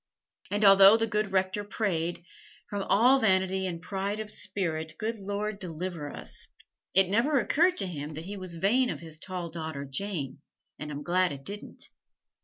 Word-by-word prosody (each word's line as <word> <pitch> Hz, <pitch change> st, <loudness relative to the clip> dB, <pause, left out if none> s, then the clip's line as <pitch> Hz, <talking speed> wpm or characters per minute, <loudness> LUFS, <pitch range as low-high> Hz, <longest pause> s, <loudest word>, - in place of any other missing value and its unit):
And 205 Hz, +1 st, +1 dB
although 195 Hz, +2 st, +9 dB
the 225 Hz, -, +2 dB
good 210 Hz, -2 st, -1 dB
Rector 190 Hz, +2 st, 0 dB
prayed, 175 Hz, -5 st, -2 dB, 0.5 s
"From 205 Hz, -1 st, -2 dB
all 250 Hz, +7 st, +5 dB
vanity 190 Hz, -3 st, +2 dB
and 170 Hz, -2 st, -4 dB
pride 200 Hz, +2 st, -2 dB
of 215 Hz, -1 st, -3 dB
spirit, 160 Hz, -7 st, -2 dB
good 225 Hz, +2 st, -2 dB
Lord, 205 Hz, +1 st, -3 dB
deliver 170 Hz, -4 st, -5 dB
us," -, -, -5 dB, 0.5 s
it 190 Hz, 0 st, +6 dB
never 245 Hz, +9 st, +2 dB
occurred 340 Hz, -, +2 dB
to -, -, +1 dB
him 150 Hz, -4 st, -6 dB
that 160 Hz, +2 st, -6 dB
he 200 Hz, +2 st, -6 dB
was 185 Hz, -3 st, -5 dB
vain 240 Hz, +9 st, +2 dB
of -, -, -4 dB
his 160 Hz, -2 st, -6 dB
tall 180 Hz, -2 st, -5 dB
daughter 160 Hz, -4 st, -5 dB
Jane, 140 Hz, -2 st, -3 dB, 0.4 s
and 150 Hz, -, -5 dB
I'm 145 Hz, 0 st, -5 dB
glad 180 Hz, +2 st, +2 dB
it 140 Hz, -1 st, -7 dB
didn't. 205 Hz, +2 st, -7 dB
190 Hz, 175 wpm, -28 LUFS, 165-205 Hz, 0.5 s, although